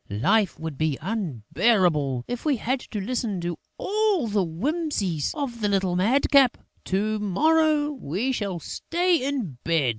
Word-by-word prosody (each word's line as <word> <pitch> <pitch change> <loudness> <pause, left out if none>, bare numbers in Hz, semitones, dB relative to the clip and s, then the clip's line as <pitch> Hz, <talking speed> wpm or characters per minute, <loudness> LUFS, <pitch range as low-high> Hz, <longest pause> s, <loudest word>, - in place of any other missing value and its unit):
Life 190 - +1
would 160 -3 -6
be 155 -3 +1
unbearable 160 - 0
if 245 -1 -4
we 295 -4 +1
had 255 +4 -1
to 215 - -6
listen 215 -2 -2
to 170 -2 -4 0.2
all 415 - +1
the 205 -3 +1
whimsies 195 - -1
of 260 -6 -4
that 205 - +1
little 190 -3 +1
madcap!... 260 +6 +4 0.3
To 210 +3 0
morrow, 300 - +2
we 240 - -2
shall 200 -7 -2
stay 345 - 0
in 245 - -3
bed!..." 160 -6 +2
210 Hz, 145 wpm, -25 LUFS, 170-275 Hz, 0.3 s, madcap